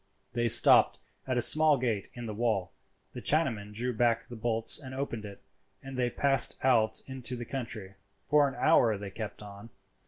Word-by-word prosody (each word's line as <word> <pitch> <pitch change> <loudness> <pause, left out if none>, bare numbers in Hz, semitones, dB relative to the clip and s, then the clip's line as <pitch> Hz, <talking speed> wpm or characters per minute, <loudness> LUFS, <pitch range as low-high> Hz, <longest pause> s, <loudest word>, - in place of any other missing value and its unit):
They 120 0 -1
stopped 120 +1 +5 0.3
at 130 -1 -1
a - - +2
small 155 +2 +7
gate 115 -6 -3
in 120 -1 -8
the 110 - -6
wall, 105 -4 -2 0.4
the - - -9
Chinaman 120 -10 -1
drew 120 +4 -4
back 115 0 0
the 120 - -10
bolts 115 +2 +1
and 130 -3 -10
opened 120 -5 -5
it, 100 -1 -12 0.4
and 135 0 -9
they 125 -1 -1
passed 135 +1 +1
out 115 -4 +1
into 130 -1 -3
the 120 -1 -7
country. 115 -7 -7 0.3
For 145 -1 +3
an 135 - -7
hour 120 -10 +2
they 100 0 -8
kept 105 0 -8
on. 100 +2 -12
120 Hz, 185 wpm, -28 LUFS, 110-130 Hz, 0.4 s, small